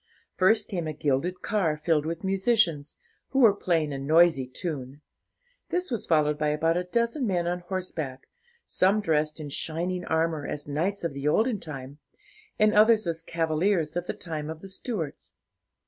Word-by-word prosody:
First 210 +3 +3
came 175 -5 -3
a 155 - -3
gilded 150 +5 -1
car 180 -8 +1
filled 155 -1 +1
with 165 +2 -4
musicians, 190 -6 +1 0.3
who 270 - 0
were 225 -5 +7
playing 165 -7 0
a 135 - -4
noisy 155 -1 +4
tune. 140 0 -6 0.7
This 360 -4 -2
was 235 - -3
followed 150 -2 +2
by 150 - +1
about 160 +2 +1
a 180 +1 -1
dozen 235 +7 0
men 175 -3 0
on 175 +1 -1
horseback, 175 -7 -5 0.4
some 195 +3 +2
dressed 155 -5 0
in 150 -2 -6
shining 175 +5 -3
armour, 160 -2 0
as 145 -1 -5
knights 175 +8 -1
of 170 - -2
the 140 +1 -3
olden 220 +7 +2
time, 140 -3 -8 0.6
and 215 0 +4
others 220 0 +5
as 165 -1 -2
cavaliers 165 0 0
of 175 0 -2
the - - -2
time 155 -3 -5
of 160 0 -7
the 195 - -10
Stuarts. 190 - -5
165 Hz, 170 wpm, -27 LUFS, 150-190 Hz, 0.7 s, were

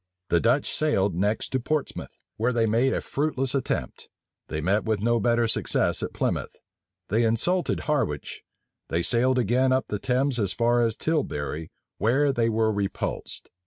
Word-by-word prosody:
The 85 - +3
Dutch 125 - +1
sailed 100 - +1
next 100 +6 0
to 130 - 0
Portsmouth, 155 +4 -3 0.2
where 115 +3 +1
they 115 -2 +2
made 115 +5 +2
a - - -1
fruitless 135 -3 -1
attempt: 135 -3 -3 0.4
they 75 - -3
met 95 +7 +1
with 110 -2 0
no 120 +2 +2
better 115 +1 +2
success 110 - 0
at - - -3
Plymouth: - - -2 0.5
they 110 +4 +2
insulted 145 +12 +1
Harwich: 105 - -2 0.5
they 85 +1 0
sailed 125 +5 +3
again 125 +3 +2
up 130 0 +1
the 105 - -2
Thames 130 +2 0
as 100 -4 0
far 120 +1 +2
as 115 -2 +1
Tilbury, 80 - -2 0.3
where 135 +6 +2
they 115 -2 +1
were 110 0 +2
repulsed. 100 -1 -4
115 Hz, 160 wpm, -26 LUFS, 105-130 Hz, 0.5 s, The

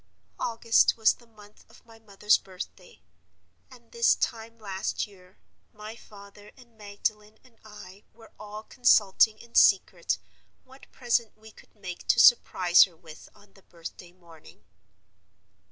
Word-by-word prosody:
August 230 0 +2
was 220 -1 +4
the 235 - -22
month 210 -2 -19
of - - -21
my 225 -1 -18
mother's 210 -1 +1
birthday; 185 -1 -12 0.7
and, - - -19
this 470 -1 +3
time 230 0 -4
last 195 -2 -4
year, 185 -2 -20 0.4
my 215 +1 -10
father 205 -1 -16
and 240 -3 -20
Magdalen 210 +1 -5
and 250 -3 -25
I 205 -2 -14
were 225 0 -19
all 210 +1 -9
consulting 220 -3 +3
in 235 +1 -18
secret - - +3 0.5
what 265 +1 -19
present 235 -3 -2
we 220 0 -16
could - - -21
make 185 -4 -9
to - - +3
surprise 180 -7 +5
her 175 -4 -19
with 160 -2 -15
on 205 -1 -22
the 195 - -21
birthday 175 0 -12
morning. 165 - -19
210 Hz, 140 wpm, -26 LUFS, 190-225 Hz, 0.7 s, surprise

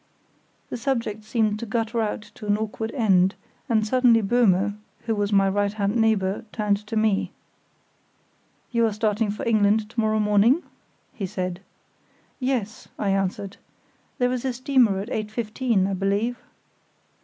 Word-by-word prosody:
The - - -3
subject 230 -4 -2
seemed 215 -1 0
to 235 - -5
gutter 230 +1 -1
out 210 -1 -2
to 210 - -9
an 205 0 +3
awkward 220 +1 -4
end, 195 -7 +3 0.3
and 220 -2 +2
suddenly 235 -1 +4
Böhme, 205 -2 +2 0.3
who 225 - 0
was 205 -1 -1
my 195 -1 +4
right 200 +1 0
hand 205 0 -1
neighbour, 220 -3 +1
turned 210 -2 +1
to 225 - -4
me. 215 -2 +1 1.4
"You 235 -2 +3
are 215 - -2
starting 215 0 0
for 210 - -4
England 215 -1 +3
to 235 - -4
morrow 215 -1 +2
morning?" 210 - +3 0.5
he 195 -4 -4
said. 185 -2 -4 0.8
"Yes," 250 -5 -2
I 200 -2 0
answered; 195 0 -2 0.6
"there 245 0 +1
is 250 -1 -2
a 260 -1 -1
steamer 250 -5 +2
at 200 +4 -4
8.15, 215 -1 -1
I 195 - -2
believe." 200 +6 0
215 Hz, 150 wpm, -24 LUFS, 200-230 Hz, 1.4 s, suddenly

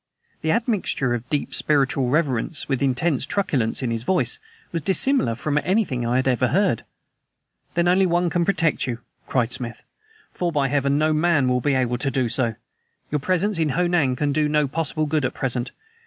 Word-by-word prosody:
The 160 - -2
admixture 210 - 0
of 120 +1 -5
deep 145 - -2
spiritual 135 -3 +2
reverence 145 0 0
with 135 -2 -1
intense 140 +2 +1
truculence 140 - 0
in 120 - -1
his 115 -1 -1
voice 190 - +1 0.3
was 165 - -2
dissimilar 190 - +2
from 150 +4 0
anything 150 - 0
I 120 +2 +1
ever 125 -1 +2
had 125 - -1
heard. 190 - +1 0.9
"Then 170 0 +2
only 185 +1 +4
One 175 0 +1
can 175 - +1
protect 165 -7 +1
you," 120 -2 -2 0.3
cried 125 -2 0
Smith, 120 -2 -5 0.5
"for, 175 -1 -1
by 140 -4 +1
Heaven, 140 0 +1
no 155 +1 +2
MAN 155 -3 +2
will 125 0 +1
be 140 +2 +1
able 125 -2 0
to 140 - 0
do 130 -2 0
so! 115 -2 0 0.6
Your 150 - +1
presence 185 +4 0
in 160 -2 +1
Ho 180 - +3
Nan 165 -7 +2
can 145 +2 0
do 150 0 +1
no 150 -1 +2
possible 155 +1 -1
good 150 -1 0
at 130 - -2
present. 125 -2 -2
145 Hz, 190 wpm, -23 LUFS, 125-170 Hz, 0.9 s, only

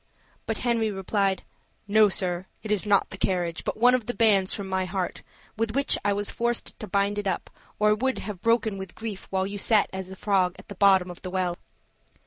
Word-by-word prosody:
But 225 - -1
Henry 230 -3 +1
replied: 195 0 0 0.4
"No, 210 0 +5
sir, 185 -1 -1 0.2
it 215 - -4
is 210 0 +1
not 200 -1 +3
the 190 - -8
carriage 175 -3 -1
but - - -3
one 245 +3 +5
of 250 -4 0
the 245 - -3
bands 200 -5 +4
from 200 -2 -2
my 190 0 0
heart, 185 0 -3 0.4
with 225 +1 -1
which 275 0 +3
I 205 - +2
was 205 0 -1
forced 235 0 -2
to 215 - -6
bind 200 0 +1
it 205 - -3
up, 190 - -2 0.3
or 210 0 +4
it 210 - +1
would 260 +1 0
have 205 -4 -6
broken 230 -3 +1
with 190 -2 -8
grief 220 -4 -6
while 190 -1 0
you 200 +1 -5
sat 215 0 +3
as 190 -1 -5
a 190 - -8
frog 190 -2 +1
at - - -15
the - - -6
bottom 190 -2 +4
of 175 - -12
the 185 - -5
well." 180 -1 -1
200 Hz, 225 wpm, -26 LUFS, 190-220 Hz, 0.4 s, No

